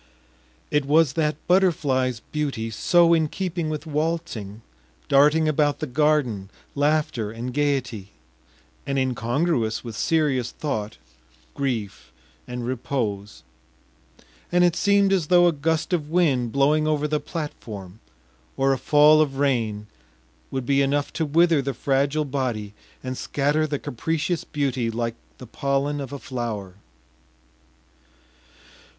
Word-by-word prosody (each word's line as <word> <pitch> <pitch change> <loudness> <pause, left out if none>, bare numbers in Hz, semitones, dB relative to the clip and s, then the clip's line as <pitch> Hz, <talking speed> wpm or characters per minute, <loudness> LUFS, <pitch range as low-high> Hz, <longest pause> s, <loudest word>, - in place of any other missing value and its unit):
It 150 -2 +1
was 150 -1 +3
that 155 -1 0
butterfly’s 140 - +2
beauty 140 -7 -2
so 170 - +4
in 160 -2 +3
keeping 175 -1 -3
with 155 0 -4
waltzing, 150 - -3 0.4
darting 150 +3 +4
about 150 -1 +2
the 155 - -3
garden, 130 -8 +1 0.2
laughter 145 -6 0
and 120 +3 -6
gaiety, 130 -8 -1 0.8
and 140 0 -1
incongruous 125 -1 0
with 115 -3 -7
serious 145 -7 +1
thought, 110 -8 -4 0.6
grief, 105 - -3 0.4
and 125 -1 -5
repose; 115 -5 -3 1.1
and 180 0 +4
it 175 -1 +3
seemed 200 -1 +3
as 175 -6 +1
though 175 0 +5
a 175 - +5
gust 160 +3 -1
of 155 -4 -1
wind 140 -9 +2
blowing 150 +4 +2
over 150 -1 +1
the 150 0 0
platform, 110 - -7 0.6
or 135 0 +3
a 130 - -3
fall 150 +3 +5
of 140 -3 -1
rain, 115 -7 0 0.6
would 130 -2 -3
be 140 +2 +2
enough 140 +1 0
to 160 -2 -1
wither 165 0 +4
the 135 -1 -3
fragile 140 +4 0
body 125 -7 -3 0.3
and 130 0 -4
scatter 145 +2 0
the 145 -1 -2
capricious 160 +7 -2
beauty 135 -5 -1
like 115 0 -2 0.2
the 125 - -10
pollen 140 +3 -1
of 135 - -7
a 140 - -5
flower. 115 -8 -5
140 Hz, 130 wpm, -24 LUFS, 120-155 Hz, 1.1 s, though